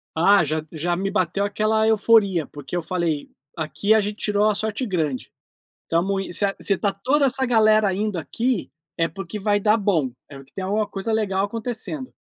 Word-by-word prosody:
Ah, 195 +4 +5
já 155 +1 -1
já 170 +2 -1
me 195 +2 -2
bateu 195 0 0
aquela 215 +2 +1
euforia, 210 -6 +3
porque 145 +2 -8
eu 175 - 0
falei: 165 -3 -2 0.3
"Aqui 160 +7 0
a 220 - +4
gente 205 +1 -4
tirou 210 0 +2
a 210 - 0
sorte 220 +4 -2
grande. 160 - -2 0.5
Estamos 195 +4 0
in - - -8
se 200 - +3
se 200 - +3
está 200 0 -1
toda 275 +8 +1
essa 265 0 0
galera 215 -4 +4
indo 210 +1 -2
aqui, 230 - -2 0.3
é 165 0 +1
porque 195 +2 -7
vai 205 +1 +2
dar 210 +2 +3
bom, 175 - 0 0.2
é 140 -2 -11
que 135 - -28
tem 190 - -4
uma 210 +3 0
coisa 205 +3 -4
legal 200 -3 0
acontecendo". 240 +5 -4
200 Hz, 190 wpm, -22 LUFS, 175-215 Hz, 0.5 s, Ah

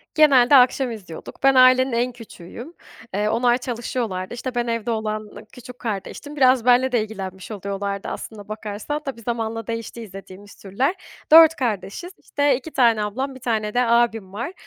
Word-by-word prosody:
Genelde 280 -4 +6
akşam 255 0 +4
izliyorduk. 200 0 -10
Ben 270 0 +5
ailenin 255 +1 +6
en 240 +2 0
küçüğüyüm. 235 - -11 0.4
Eee, 210 +2 0
onlar 240 +2 +2
çalışıyorlardı. 230 -6 -4
İşte, 245 +1 -6
ben 240 0 -1
evde 230 0 -2
olan 215 -1 -3 0.2
küçük 250 0 -12
kardeştim. 235 +6 -6
Biraz 255 -4 +3
benle 250 +1 +4
de 240 -3 +2
ilgilenmiş 195 -2 -8
oluyorlardı 200 0 -4
aslına 210 -2 -7
bakarsan. 215 +7 -5
Tabii, 265 -4 -6
zamanla 225 -1 -4
değişti 230 0 -5
izlediğimiz 195 -1 -12
türler. 250 - -2 0.4
4 325 0 +9
kardeşiz, 230 - -4
işte 285 -2 0
t 295 +5 -10
tane 230 -6 +3
ablam, 260 +6 -4
1 - - -11
tane 220 -3 -2
de 245 - +2
abim 230 -5 +1
var. 240 - -5
235 Hz, 160 wpm, -22 LUFS, 210-255 Hz, 0.4 s, 4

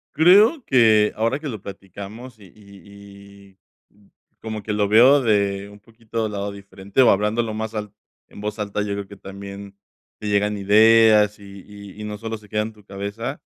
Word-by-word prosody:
Creo 205 - +5
que 110 -4 +4
ahora 115 +5 -1
que 155 - -7
lo 110 -6 -7
platicamos 100 +5 -10
y 100 - -15
y 100 0 -16 0.3
y, - - -36
mm, 100 -1 -26 0.3
como 110 -2 -6
que 105 - -3
lo 105 -1 +1
veo 125 +7 +6
de 100 -3 0
un 105 0 -15
poquito 115 +1 -6
del 110 - -3
lado 100 0 -4
diferente 100 +3 -3
o 125 - +6
hablándolo 110 +3 0
más 110 +1 -5
al 105 -1 -5 0.4
en - - -13
voz 105 +1 -4
alta, 105 0 -3
yo 105 -1 -3
creo 100 -1 -5
que 100 +1 -13
también 100 +1 -10 0.4
te 105 - -6
llegan 105 0 0
ideas 105 +1 +5
y 100 -1 -12
y 100 0 -12
y - - -6
no 105 0 -6
solo 110 +1 -6
se 105 -1 -19
queda 105 - -1
en 110 +1 -7
tu 105 -1 -21
cabeza. 100 +8 -6
105 Hz, 195 wpm, -21 LUFS, 100-110 Hz, 0.4 s, veo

